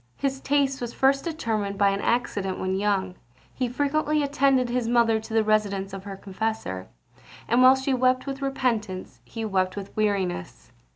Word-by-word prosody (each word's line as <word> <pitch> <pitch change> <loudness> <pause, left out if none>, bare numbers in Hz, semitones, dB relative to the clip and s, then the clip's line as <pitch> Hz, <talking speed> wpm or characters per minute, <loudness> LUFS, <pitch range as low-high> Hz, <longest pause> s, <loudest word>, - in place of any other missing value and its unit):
His 270 -1 -1
taste 275 -1 +1
was 240 -1 -5
first 275 +1 +3
determined 220 -11 -2
by 200 0 +4
an 195 0 -1
accident: 205 -5 0
when 185 0 -2
young, 195 -2 0 0.4
he 255 -2 -2
frequently 295 +3 0
attended 275 -2 +2
his 240 -1 -1
mother 230 -2 +3
to 220 +1 -11
the 220 - +4
residence 200 -2 0
of 195 0 -7
her 200 -1 -6
confessor; 195 - -4 0.6
and 240 +2 +3
while 255 +1 +8
she 265 +1 -1
wept 255 0 +2
with 275 0 -5
repentance, 225 - -2
he 225 - -5
wept 185 -3 0
with 200 -1 -7
weariness! 200 - -2
225 Hz, 170 wpm, -25 LUFS, 195-265 Hz, 0.6 s, while